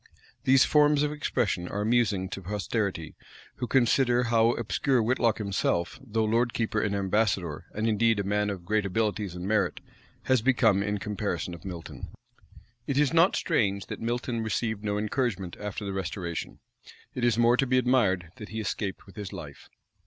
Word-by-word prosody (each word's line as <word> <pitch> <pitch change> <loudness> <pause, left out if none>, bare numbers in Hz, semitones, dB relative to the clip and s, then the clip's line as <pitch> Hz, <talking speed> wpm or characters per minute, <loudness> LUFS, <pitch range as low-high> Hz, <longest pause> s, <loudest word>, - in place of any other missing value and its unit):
These 130 0 +6
forms 150 -1 +4
of 150 - 0
expression 105 -11 -1
are 105 - -3
amusing 105 -4 +1
to 95 - -6
posterity, 100 -3 -2 0.4
who 125 - -3
consider 125 -1 +3
how 115 0 +3
obscure 125 +3 0
Whitlocke 115 0 +2
himself 100 -4 -1
though 110 -3 0
lord 115 +2 +1
keeper 110 -2 0
and 100 -1 0
ambassador, 100 -4 0
and 110 +2 0
indeed 115 0 +2
a - - 0
man 105 +1 0
of 95 -4 -6
great 110 +3 +1
abilities 100 -1 -1
and 90 +1 -5
merit, 100 -4 +1 0.4
has 130 -3 +2
become 115 -5 +3
in 105 +1 -1
comparison 100 -4 -3
of 85 - -10
Milton. 90 -3 -7 0.8
It 140 - -1
is 145 -1 +3
not 170 +3 +5
strange 100 - 0
that - - -7
Milton 120 0 -2
received 110 -1 -2
no 105 -1 -1
encouragement 105 -4 -2
after 105 0 -5
the 100 - -3
restoration: 90 -3 -4 0.5
it 125 - -4
is 120 -2 +3
more 120 +1 +5
to 135 +2 +1
be 130 +1 +2
admired 105 -10 +2
that 105 - -9
he 110 - -5
escaped 100 -2 -3
with 95 - -16
his 105 -2 -6
life. 75 -4 -10
110 Hz, 175 wpm, -27 LUFS, 100-120 Hz, 0.8 s, These